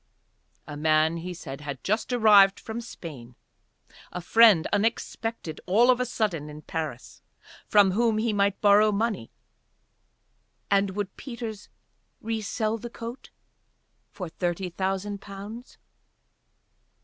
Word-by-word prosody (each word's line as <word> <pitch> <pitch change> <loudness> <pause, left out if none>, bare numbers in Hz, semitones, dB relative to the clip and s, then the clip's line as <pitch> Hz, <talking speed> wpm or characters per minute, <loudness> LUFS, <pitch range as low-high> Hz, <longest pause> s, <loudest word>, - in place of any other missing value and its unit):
A 150 - -8
man, 155 +2 +2
he 175 +2 -6
said, 150 -5 -8
had 140 -3 -7
just 215 +5 -1
arrived 210 -5 +6
from 225 +1 -6
Spain, 140 - -10 0.8
a - - -5
friend 210 -1 +5
unexpected 225 -4 -2
all 230 +7 +5
of 250 - +1
a 250 - 0
sudden 180 -11 -2
in 150 +1 -10
Paris, 155 -7 -6 0.5
from 205 -2 +5
whom 225 +2 +2
he 220 0 0
might 200 -1 +1
borrow 210 +1 +5
money: 210 - -1 1.4
and 195 -1 +2
would 205 -2 -4
Peters 235 -5 -7 0.5
resell 220 0 -2
the 240 - -7
coat 235 +2 -8 0.8
for 185 -4 -7
thirty 175 +2 -3
thousand 195 +2 -3
pounds? 205 +5 -10
200 Hz, 120 wpm, -26 LUFS, 170-225 Hz, 1.4 s, arrived